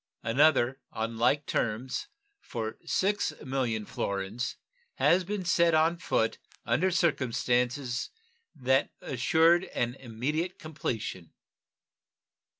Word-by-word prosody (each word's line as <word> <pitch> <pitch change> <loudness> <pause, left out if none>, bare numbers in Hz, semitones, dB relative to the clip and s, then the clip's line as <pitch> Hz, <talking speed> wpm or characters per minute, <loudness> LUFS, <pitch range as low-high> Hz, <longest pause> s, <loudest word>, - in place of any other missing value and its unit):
Another, 130 +1 +3
on 115 +1 -3
like 140 +5 +3
terms, 120 +3 -2 0.3
for 110 - -5
6,000,000 135 - -1
florins, 100 +4 -3 0.4
had 180 0 +3
been 205 -2 -3
set 170 -1 +4
on 160 +2 +3
foot 115 -9 0 0.3
under 190 +3 +2
circumstances 125 -5 0 0.5
that 130 +1 +2
assured 165 +7 +3
an 120 0 -2
immediate 135 +8 -3
completion. 115 - -5
130 Hz, 90 wpm, -29 LUFS, 115-160 Hz, 0.5 s, set